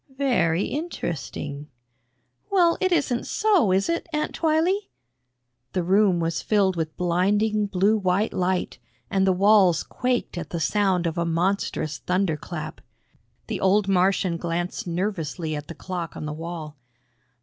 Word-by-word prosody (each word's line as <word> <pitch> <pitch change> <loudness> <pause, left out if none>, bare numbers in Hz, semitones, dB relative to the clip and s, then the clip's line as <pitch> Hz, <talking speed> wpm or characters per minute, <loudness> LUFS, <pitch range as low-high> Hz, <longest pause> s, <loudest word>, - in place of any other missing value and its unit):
"Very 190 -11 +2
interesting." 155 - -4 0.8
"Well, 350 -4 +4
it 375 -1 +2
isn't 280 -8 +1
so, 395 - +3
is 190 +1 +2
it, 335 0 -1
Aunt 300 -1 -1
Twylee?" 335 +5 +1 0.8
The 180 - 0
room 190 0 +3
was 165 0 -1
filled 195 -3 +2
with 160 -2 -3
blinding 205 +4 +1
blue 200 +3 +2
white 190 +2 +1
light, 185 0 -1 0.3
and 195 0 +2
the - - +5
walls 195 -2 +4
quaked 250 -8 -2
at 165 -3 -7
the 170 - -3
sound 185 +2 +1
of 165 +1 -1
a - - +2
monstrous 165 -4 -1
thunderclap. 175 -3 -2 0.6
The - - -4
old 195 +1 +3
Martian 185 -2 +2
glanced 175 +2 -3
nervously 170 -3 -2
at 150 0 -6
the 170 - -8
clock 175 -1 -5
on - - -5
the 150 - -4
wall. 160 -1 -7
185 Hz, 140 wpm, -24 LUFS, 170-210 Hz, 0.8 s, the